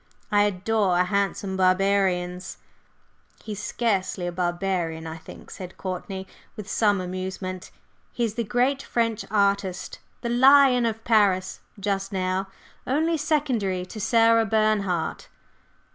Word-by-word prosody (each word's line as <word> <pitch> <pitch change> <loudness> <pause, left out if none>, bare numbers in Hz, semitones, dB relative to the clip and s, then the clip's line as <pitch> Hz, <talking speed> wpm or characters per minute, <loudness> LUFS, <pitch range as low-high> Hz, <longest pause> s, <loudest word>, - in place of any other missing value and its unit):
I 205 0 +4
adore 200 -1 +1
handsome 195 0 -1
barbarians!" 185 -1 +1 0.9
"He's 210 -2 -6
scarcely 195 -5 -1
a 175 - -2
barbarian, 175 -2 -2
I 160 0 -6
think," - - -13
said 185 -1 -9
Courtney, 190 +1 -5 0.3
with 210 -2 -8
some 205 -3 +2
amusement; 185 0 -5 0.4
"he 240 - -2
is 225 -3 0
the 235 - -2
great 250 +5 +1
French 230 -4 -1
artist, 200 -2 0 0.2
the 235 - -3
'lion' 260 0 +6
of 225 0 -4
Paris 195 -5 +2 0.2
just 195 -1 -2
now, 185 0 -1 0.4
only 315 +5 +1
secondary 260 - 0
to 215 +4 -9
Sarah 230 +1 +4
Bernhardt." 205 -6 0
200 Hz, 120 wpm, -25 LUFS, 185-225 Hz, 0.9 s, lion